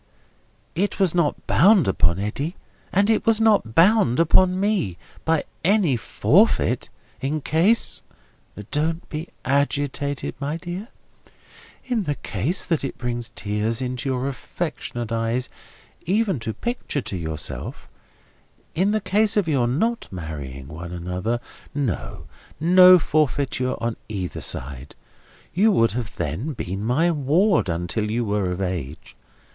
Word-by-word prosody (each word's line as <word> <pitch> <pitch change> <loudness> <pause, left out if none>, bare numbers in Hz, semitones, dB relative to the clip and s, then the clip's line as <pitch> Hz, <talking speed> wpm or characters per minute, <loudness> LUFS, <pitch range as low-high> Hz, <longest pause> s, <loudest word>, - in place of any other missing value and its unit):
"It 200 +6 -1
was 190 -4 +4
not 170 -4 0
bound 195 - +5
upon 85 -2 +2
Eddy, 140 - -3 0.4
and 200 +2 +3
it 220 -1 +2
was 225 -1 +3
not 210 - +3
bound 170 - +5
upon 185 +3 +4
me, 195 - 0 0.3
by 160 -1 +2 0.2
any 185 -6 +3
forfeit, 115 - +2 0.3
in 145 +4 -1
case—" 170 +10 +2 0.7
"Don't 160 +3 -1
be 155 +3 -5 0.2
agitated, 140 +1 0
my 145 +3 -2
dear. 180 +5 -6 1.0
In 240 -6 -1
the 145 -2 -1
case 135 - -1
that 165 -5 0
it 135 - -4
brings 120 -1 -3
tears 105 +2 -1
into 125 +1 -3
your 130 0 -1
affectionate 135 -4 -5
eyes 115 +2 -1 0.6
even 195 - +1
to 115 0 -3
picture 150 - -3
to 100 - -5
yourself—in 85 - -5
the 215 +1 +1
case 215 +3 +1
of 200 -5 +2
your 135 -6 +2
not 225 - 0
marrying 75 -6 -7
one 85 +3 -8
another—no, 110 - -4 0.3
no 180 +2 +8
forfeiture 140 -5 0
on 115 -1 -2
either 95 -4 -4
side. 70 +1 -3 0.6
You 210 +6 +4
would 115 -9 +3
then 105 - -3
have 155 - -5
been 95 +2 -4
my 145 +10 +2
ward 160 - +2
until 90 +6 -2
you 115 +2 0
were 100 -3 0
of 90 +2 -4
age. 80 -6 -5
140 Hz, 130 wpm, -23 LUFS, 105-175 Hz, 1.0 s, no